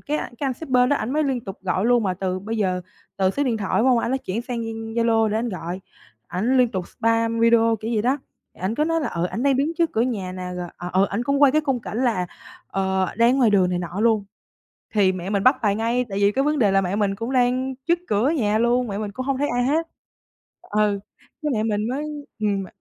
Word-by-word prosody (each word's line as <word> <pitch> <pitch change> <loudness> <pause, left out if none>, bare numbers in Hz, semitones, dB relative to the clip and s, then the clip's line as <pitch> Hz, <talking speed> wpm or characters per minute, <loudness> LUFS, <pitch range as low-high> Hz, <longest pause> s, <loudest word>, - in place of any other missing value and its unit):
cái 300 +1 -2
anh 240 - -5
cái 285 - -1
anh 265 - 0
shipper 255 -5 +2
đó 285 - +4
ảnh 235 +2 -3
mới 310 +1 +1
liên 265 -3 0
tục 195 -2 -8
gọi 190 +2 0
luôn, 240 -1 +4
mà 185 -3 0
từ 185 0 -2
bây 225 +3 -4
giờ 185 -3 0 0.4
từ 190 -1 +2
số 285 +8 -1
điện 240 -4 0
thoại, 200 -3 -3
đúng 250 - +3
hông? 250 -2 +4
Anh 235 - -1
ấy 265 - +1
chuyển 225 -1 -4
sang 240 -1 -4
Za 225 0 -5
Zalo 230 -1 +3
để 210 - -1
ảnh 235 +1 -1
gọi, 180 -1 -5 0.5
ảnh 225 +9 0
liên 250 -1 +5
tục 185 -5 -4
spam 230 0 0
video 230 -1 +4
kiểu 225 +2 -4
vậy 210 - +1
đó, 260 +5 +1 0.4
thì - - -19
ảnh 190 +4 -1
cứ 300 +5 +1
nói 330 0 +1
là, 295 - -1
ờ, 170 0 -2
ảnh 230 - -4
đang 275 -2 +3
đứng 290 +4 +1
trước 335 -2 +2
cửa 220 - 0
nhà 205 -7 -2
nè, 185 0 -6
rồi, 175 -1 -4
à, 175 - -5
ừ, 190 +2 +4
ảnh 215 +4 -2
cũng 280 +2 +1
quay 275 - +7
cái 310 - +3
khung 270 -5 -1
cảnh 220 - -5
là, 185 -7 +1 0.4
ờ, 190 -1 0
đang 235 +4 +4
ngoài 240 -5 +4
đường 185 -3 +3
này 180 - 0
nọ 175 +2 -4
luôn. 220 -2 +3 0.7
Thì 200 -3 +4
mẹ 185 0 -5
mình 200 -1 0
bắt 255 +2 +6
bài 205 -3 +2
ngay, 235 +3 0
tại 195 - -3
vì 200 0 +4
cái 270 - +1
vấn 300 0 +1
đề 205 -4 +4
là 195 0 +4
mẹ 185 +2 -1
mình 200 -2 +1
cũng 230 +5 -4
đang 255 +1 +1
trước 340 +1 +3
cửa 215 +7 +2
nhà 215 -9 +1
luôn, 240 +2 +2
mẹ 200 - -4
mình 210 -1 -4
cũng 255 +5 -5
hông 275 -1 0
thấy 290 - 0
ai 245 0 +1
hết. 315 +6 +1 0.7
Ừ, 210 -1 0 0.4
cái 300 - 0
mẹ 215 -2 0
mình 215 0 0
mới 280 +4 -2 0.3
ừm, 205 -2 0
mẹ - - -9
225 Hz, 270 wpm, -23 LUFS, 200-255 Hz, 0.7 s, quay